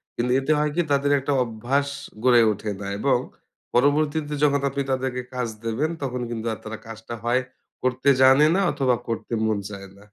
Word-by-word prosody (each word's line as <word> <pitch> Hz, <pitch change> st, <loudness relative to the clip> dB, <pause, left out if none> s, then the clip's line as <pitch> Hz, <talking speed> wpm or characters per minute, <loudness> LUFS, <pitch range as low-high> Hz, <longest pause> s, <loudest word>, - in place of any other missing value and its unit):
কিন্তু 125 Hz, +1 st, -1 dB
এতে 135 Hz, +3 st, -1 dB
হয় 150 Hz, 0 st, +1 dB
কি? 175 Hz, -, +3 dB
তাদের 140 Hz, 0 st, +2 dB
একটা 140 Hz, +2 st, -1 dB
অভ্যাস 120 Hz, +5 st, -1 dB, 0.4 s
গড়ে 125 Hz, -2 st, +6 dB
ওঠে 105 Hz, +1 st, -4 dB
না 100 Hz, -, -5 dB
এবং 135 Hz, +1 st, +3 dB, 0.6 s
পরবর্তীতে 145 Hz, +3 st, +2 dB
যখন 140 Hz, -1 st, +3 dB
আপনি 140 Hz, +1 st, -2 dB
তাদেরকে 130 Hz, -1 st, -1 dB
কাজ 125 Hz, -1 st, -1 dB, 0.2 s
দেবেন, 130 Hz, +8 st, 0 dB
তখন 125 Hz, -1 st, -3 dB
কিন্তু 115 Hz, -1 st, -4 dB, 0.2 s
তারা 110 Hz, +1 st, -6 dB
কাজটা 115 Hz, +1 st, -8 dB
হয় 120 Hz, +2 st, +2 dB, 0.4 s
করতে 130 Hz, +2 st, +1 dB
জানে 135 Hz, +3 st, +7 dB
না 195 Hz, -, +2 dB
অথবা 130 Hz, -3 st, +1 dB
করতে 115 Hz, +1 st, -4 dB
মন 110 Hz, -2 st, +1 dB
চায় 100 Hz, -1 st, -8 dB
না। 100 Hz, -, -17 dB
130 Hz, 180 wpm, -24 LUFS, 115-140 Hz, 0.6 s, জানে